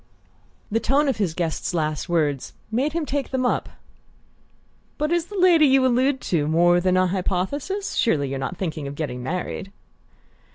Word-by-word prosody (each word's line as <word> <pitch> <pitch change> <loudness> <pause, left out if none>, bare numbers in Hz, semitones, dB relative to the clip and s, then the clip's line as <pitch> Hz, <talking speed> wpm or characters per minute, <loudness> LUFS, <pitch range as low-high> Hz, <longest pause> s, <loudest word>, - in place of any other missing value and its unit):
The 225 - +2
tone 280 +5 +2
of 270 - 0
his 185 -6 -1
guest's 170 +1 -2
last 155 -2 -2
words 150 -6 0 0.2
made 270 +7 0
him 335 -2 -1
take 280 0 -2
them 260 -1 -1
up. 245 - 0 1.3
"But 300 +2 -1
is 345 -1 +1
the 410 - -7
lady 345 -5 +6
you 265 -1 +4
allude 260 +2 +2
to 155 -4 0
more 175 +2 +4
than 185 0 +2
a 185 - +4
hypothesis? 195 - -2
Surely 145 -11 +1
you're 135 0 -3
not 135 +7 -4
thinking 155 -6 -3
of 140 - -6
getting 130 -5 -4
married?" 180 +6 -4
190 Hz, 170 wpm, -23 LUFS, -, 1.3 s, lady